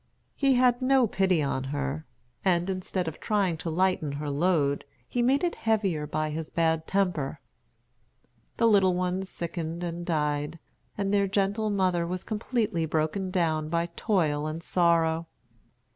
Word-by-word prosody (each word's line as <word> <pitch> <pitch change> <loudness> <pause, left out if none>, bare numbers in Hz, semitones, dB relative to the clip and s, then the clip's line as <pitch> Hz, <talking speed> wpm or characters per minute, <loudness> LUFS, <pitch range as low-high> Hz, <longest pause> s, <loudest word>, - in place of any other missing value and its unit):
He 275 -2 +3
had 245 0 +3
no 260 -1 +4
pity 190 -6 +2
on 135 -1 -1
her, 140 +2 -3 0.4
and 180 0 +2
instead 185 -1 -3
of 160 - -5
trying 200 -6 +1
to 165 - -4
lighten 170 -3 +1
her 145 0 -3
load, 145 -2 +1 0.2
he 245 - -1
made 270 +5 +3
it 345 - +1
heavier 195 -9 0
by 155 +1 -1
his 160 +1 -4
bad 160 -1 +1
temper. 180 -8 0 1.2
The 230 - +3
little 195 -4 +4
ones 185 +1 -1
sickened 170 0 -4
and 175 0 -4
died, 150 -1 -1 0.4
and 200 -1 -1
their 200 -1 +3
gentle 200 +2 0
mother 185 -4 +1
was 180 +1 -4
completely 215 -6 -1
broken 160 +5 -1
down 160 -4 0
by 170 +1 0
toil 155 -7 +1
and 160 +2 -5
sorrow. 165 -2 +2
175 Hz, 150 wpm, -27 LUFS, 155-195 Hz, 1.2 s, no